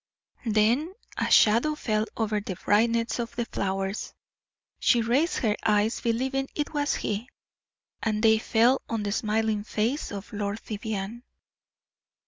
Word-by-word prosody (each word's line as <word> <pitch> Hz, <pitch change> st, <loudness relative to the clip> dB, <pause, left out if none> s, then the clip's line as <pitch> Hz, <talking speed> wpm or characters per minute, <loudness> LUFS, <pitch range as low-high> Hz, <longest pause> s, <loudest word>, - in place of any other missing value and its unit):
Then 235 Hz, -, +2 dB, 0.2 s
a -, -, -1 dB
shadow 235 Hz, +8 st, +5 dB
fell 215 Hz, -6 st, -1 dB
over 215 Hz, -2 st, 0 dB
the 195 Hz, -2 st, -5 dB
brightness 230 Hz, +5 st, +1 dB
of 235 Hz, 0 st, -4 dB
the 235 Hz, -, -1 dB
flowers. 195 Hz, -1 st, -3 dB, 0.6 s
She 235 Hz, -2 st, +3 dB
raised 270 Hz, +9 st, +2 dB
her 210 Hz, -1 st, +2 dB
eyes, 210 Hz, +2 st, +2 dB
believing 265 Hz, +3 st, -1 dB
it 295 Hz, +1 st, -2 dB
was 290 Hz, -1 st, +1 dB
he, 215 Hz, +5 st, -3 dB, 0.7 s
and 215 Hz, -1 st, -1 dB
they 220 Hz, -1 st, +5 dB
fell 235 Hz, +4 st, +3 dB
on 225 Hz, -2 st, -1 dB
the 205 Hz, -, -2 dB
smiling 215 Hz, 0 st, 0 dB
face 225 Hz, +7 st, -1 dB
of 205 Hz, +2 st, -7 dB
Lord 205 Hz, +1 st, -2 dB
Vivianne. 215 Hz, +1 st, -4 dB
220 Hz, 135 wpm, -27 LUFS, 210-240 Hz, 0.7 s, shadow